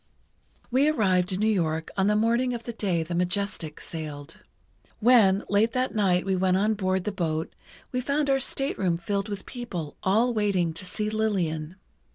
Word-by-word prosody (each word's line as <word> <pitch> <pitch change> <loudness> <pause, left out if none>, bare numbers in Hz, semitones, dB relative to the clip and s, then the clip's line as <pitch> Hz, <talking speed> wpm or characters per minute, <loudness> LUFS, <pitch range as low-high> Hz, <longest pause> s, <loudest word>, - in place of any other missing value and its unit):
We 270 +4 +4
arrived 190 -9 +2
in 185 - -1
New - - +3
York 160 -5 -1
on 190 0 +2
the 210 - +3
morning 235 +3 +2
of 235 - -7
the 235 - -5
day 185 -7 0
the 165 +2 -6
Majestic 180 -3 -2
sailed. 155 -1 -7 0.6
When, 215 -4 +5
late 210 +3 +2
that 255 0 0
night 190 -5 +2
we 190 -1 +1
went 185 0 +2
on 210 +3 +2
board 190 -2 0
the 210 - -2
boat, 165 -4 -2 0.4
we 250 - -1
found 285 +3 0
our 270 -1 +3
stateroom 200 -10 -1
filled 200 +4 -2
with 200 -2 -5
people 190 - -6
all 225 +6 +2
waiting 195 -6 +1
to 170 - -7
see 210 +4 -2
Lillian. 180 -7 -1
195 Hz, 180 wpm, -26 LUFS, 175-225 Hz, 0.6 s, When